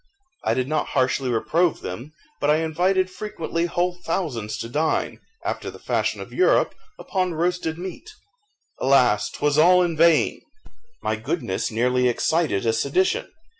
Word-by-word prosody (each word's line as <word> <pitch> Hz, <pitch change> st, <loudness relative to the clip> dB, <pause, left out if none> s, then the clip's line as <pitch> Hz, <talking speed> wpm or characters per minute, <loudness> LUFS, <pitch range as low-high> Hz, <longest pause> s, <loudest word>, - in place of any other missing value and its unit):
I -, -, +1 dB
did 130 Hz, 0 st, -1 dB
not 155 Hz, +1 st, -1 dB
harshly 130 Hz, 0 st, +1 dB
reprove 165 Hz, +9 st, +1 dB
them, 120 Hz, +12 st, -7 dB, 0.3 s
but 145 Hz, -, +1 dB
I 150 Hz, -, +5 dB
invited 175 Hz, +4 st, +1 dB
frequently 170 Hz, -4 st, -3 dB
whole 175 Hz, +1 st, -1 dB
thousands 135 Hz, -, -2 dB
to 115 Hz, -, -5 dB
dine, 150 Hz, +6 st, -1 dB, 0.3 s
after -, -, -3 dB
the -, -, -10 dB
fashion -, -, -1 dB
of -, -, -9 dB
Europe, 370 Hz, -, +3 dB, 0.2 s
upon 185 Hz, -3 st, -2 dB
roasted 170 Hz, -1 st, -1 dB
meat. 185 Hz, -, -7 dB, 0.7 s
Alas, 130 Hz, -5 st, +3 dB
'twas 150 Hz, 0 st, 0 dB
all 180 Hz, +3 st, +6 dB
in 170 Hz, -2 st, -1 dB
vain! 165 Hz, 0 st, +3 dB, 0.6 s
my -, -, 0 dB
goodness 350 Hz, -, -2 dB
nearly 125 Hz, +2 st, +1 dB
excited 125 Hz, -, +1 dB
a 115 Hz, -, +2 dB
sedition. 140 Hz, +11 st, 0 dB
160 Hz, 145 wpm, -23 LUFS, 130-175 Hz, 0.7 s, all